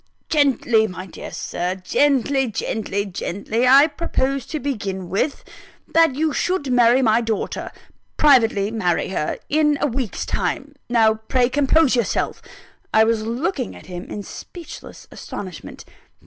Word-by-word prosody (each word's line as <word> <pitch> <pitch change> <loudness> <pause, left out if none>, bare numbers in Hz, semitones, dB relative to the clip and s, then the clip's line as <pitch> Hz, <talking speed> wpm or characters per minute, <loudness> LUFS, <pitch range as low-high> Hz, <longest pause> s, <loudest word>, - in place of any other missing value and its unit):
"Gently, 250 -7 +3
my 185 -1 -7
dear 185 - -9
Sir! 180 +2 -3
gently, 270 +6 +1
gently, 205 -2 -2
gently! 205 +5 -2
I 275 +3 +8
propose 275 -4 -2
to 310 - -4
begin 200 -10 -4
with: 240 +9 -1 0.5
that 325 -5 +4
you 310 +1 0
should 360 -6 -1
marry 245 +1 +5
my 225 0 +4
daughter 225 -2 -3 0.5
privately 225 -8 +4
marry 180 -7 0
her 170 -5 -2
in 300 -1 +2
a - - +1
week's 255 -5 -3
time. 285 +2 -2 0.2
Now, 225 -2 +4
pray 240 +3 0
compose 285 +1 +3
yourself!" 235 -5 -1 0.5
(I 220 - +5
was 225 0 +1
looking 255 - -2
at - - -13
him 180 -1 -7
in 205 - -6
speechless 340 - -10
astonishment.) 185 -5 -8
240 Hz, 135 wpm, -21 LUFS, 210-280 Hz, 0.5 s, I